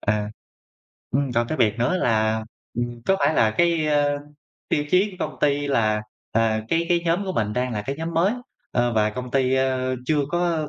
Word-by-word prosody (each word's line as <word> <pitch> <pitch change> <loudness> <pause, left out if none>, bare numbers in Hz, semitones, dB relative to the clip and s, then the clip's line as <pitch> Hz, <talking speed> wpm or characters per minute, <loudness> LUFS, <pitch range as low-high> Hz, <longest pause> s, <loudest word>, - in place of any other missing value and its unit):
À, 105 0 0 0.8
ừm, 135 0 0
còn 120 0 +1
cái 155 - -3
việc 110 -2 +2
nữa 120 +10 +2
là, 110 -6 +1 0.4
ừm, 120 -1 -3
có 195 - +4
phải 145 +3 +2
là 110 - +4
cái, 170 +4 +2
ơ, 145 -1 +2 0.5
tiêu 145 - +1
chí 195 +3 +3
của 185 - -12
công - - -14
ty 145 -1 +2
là, 110 -5 +2 0.3
ờ, 110 -1 +2
cái 165 0 +1
cái 175 -1 +3
nhóm 170 +4 +1
của 190 - -3
mình 105 - -1
đang 125 +2 -1
là 105 -2 -2
cái 135 +6 -4
nhóm 165 +2 -4
mới, 175 +6 +3 0.4
ờ, 120 -1 +1
và 105 -1 +2
công 125 +2 -6
ty, 130 -1 +2
ơ, 130 -1 0
chưa 155 -1 +2
có 170 -3 0
130 Hz, 210 wpm, -23 LUFS, 115-160 Hz, 0.8 s, có